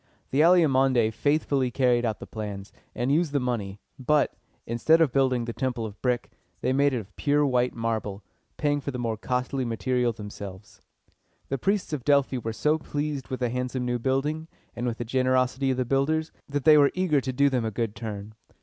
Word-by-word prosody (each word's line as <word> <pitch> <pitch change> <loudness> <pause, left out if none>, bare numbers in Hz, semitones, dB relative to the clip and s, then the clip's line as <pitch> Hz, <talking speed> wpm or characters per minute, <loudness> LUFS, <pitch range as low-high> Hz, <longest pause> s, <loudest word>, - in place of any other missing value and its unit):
The 135 - +1
Alcmæonidæ 135 -9 +4
faithfully 140 -1 +1
carried 125 -1 +2
out 110 -2 -1
the - - -9
plans, 105 -2 -7 0.2
and 125 +3 0
used 155 0 +2
the 140 - +2
money; 110 -6 -3 0.2
but, 145 +3 +2 0.3
instead 120 +8 +3
of 160 -5 +3
building 130 -3 +2
the 115 - -4
temple 125 -3 -2
of 105 -1 -9
brick, 125 -2 -1 0.3
they 130 - +1
made 140 +1 +3
it 130 - -1
of 100 -3 -8
pure 145 0 +2
white 125 -2 +1
marble, 110 -3 -3 0.3
paying 145 -1 +1
for 140 - -4
the 130 - -4
more 115 -2 -1
costly 125 +4 -2
material 125 +1 0
themselves. 105 -2 -9 0.7
The 135 - -2
priests 195 +1 0
of 140 -5 -3
Delphi 140 -2 +3
were 115 -1 -3
so 150 +7 +1
pleased 145 -2 -3
with 130 0 -5
the 125 - +1
handsome 125 +1 -2
new 125 0 -1
building, 145 +6 -1 0.3
and 120 +1 -2
with 120 -1 -2
the 120 - -4
generosity 130 +2 +1
of 130 - 0
the 130 - 0
builders, 155 +5 0 0.2
that 145 -1 -2
they 155 -1 +7
were 140 -1 +6
eager 175 -6 +2
to 130 - -3
do 140 +3 +3
them 125 -3 +1
a 110 - -1
good 110 0 -3
turn. 105 -2 -6
130 Hz, 200 wpm, -26 LUFS, 115-140 Hz, 0.7 s, they